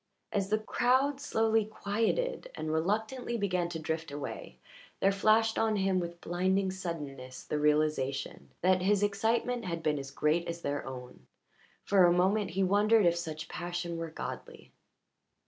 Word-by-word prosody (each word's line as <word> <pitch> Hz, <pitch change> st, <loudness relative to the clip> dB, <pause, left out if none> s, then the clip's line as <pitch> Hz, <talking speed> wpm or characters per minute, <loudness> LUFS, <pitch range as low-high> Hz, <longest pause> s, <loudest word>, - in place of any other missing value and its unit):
As 195 Hz, -1 st, -1 dB
the 215 Hz, -, +3 dB
crowd 260 Hz, +6 st, +1 dB
slowly 225 Hz, -5 st, +2 dB
quieted 225 Hz, -, -1 dB
and 155 Hz, 0 st, -3 dB
reluctantly 220 Hz, +9 st, -1 dB
began 180 Hz, -4 st, 0 dB
to 170 Hz, -, -4 dB
drift 160 Hz, 0 st, -3 dB
away 145 Hz, 0 st, -7 dB, 0.4 s
there 195 Hz, -, +4 dB
flashed 220 Hz, +3 st, +3 dB
on 220 Hz, -1 st, +2 dB
him 190 Hz, -2 st, +1 dB
with 170 Hz, -1 st, -5 dB
blinding 190 Hz, +2 st, +1 dB
suddenness 145 Hz, -9 st, -6 dB
the 150 Hz, -, -2 dB
realization 150 Hz, -3 st, 0 dB
that 185 Hz, +1 st, +3 dB
his 200 Hz, +2 st, +2 dB
excitement 225 Hz, +4 st, 0 dB
had 170 Hz, -2 st, -3 dB
been 150 Hz, -2 st, +1 dB
as 135 Hz, 0 st, -6 dB
great 155 Hz, +4 st, +1 dB
as 170 Hz, 0 st, -5 dB
their 145 Hz, 0 st, -2 dB
own; 125 Hz, -1 st, -9 dB, 0.6 s
for 195 Hz, -2 st, +4 dB
a 175 Hz, -, +5 dB
moment 190 Hz, +3 st, +2 dB
he 195 Hz, -, +3 dB
wondered 205 Hz, +2 st, +4 dB
if 170 Hz, 0 st, +4 dB
such 160 Hz, -2 st, -5 dB
passion 175 Hz, -1 st, -4 dB
were 165 Hz, 0 st, -4 dB
godly. 160 Hz, -, -8 dB
185 Hz, 155 wpm, -31 LUFS, 160-215 Hz, 0.6 s, a